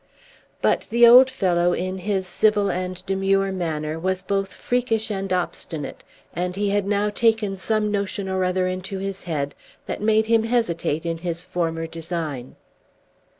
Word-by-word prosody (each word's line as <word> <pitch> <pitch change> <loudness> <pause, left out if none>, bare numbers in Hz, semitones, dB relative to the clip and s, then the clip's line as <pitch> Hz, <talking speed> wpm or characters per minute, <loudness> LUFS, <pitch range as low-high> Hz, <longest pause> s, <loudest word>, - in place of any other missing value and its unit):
But - - +2
the 235 +1 +6
old 250 +2 +9
fellow, 175 -8 +1
in 185 +2 -3
his 190 0 -1
civil 205 +1 +2
and 185 0 -4
demure 195 0 +1
manner, 160 -4 -3
was 185 +2 -1
both 195 -1 -1
freakish 230 -3 -1
and 195 -1 -3
obstinate; 170 -4 -3 0.3
and 180 +1 -2
he 200 0 0
had 200 -1 0
now 205 +1 +1
taken 220 -3 +1
some 210 +2 0
notion 200 -1 -2
or 190 0 0
other 185 0 +1
into 185 +1 -3
his 195 0 -5
head 145 -4 -2 0.3
that - - -5
made 220 +1 +3
him 225 0 +3
hesitate 170 -9 0
in 165 -1 -2
his 170 0 -3
former 165 -2 -2
design. 160 -6 -4
190 Hz, 155 wpm, -23 LUFS, 175-210 Hz, 0.3 s, old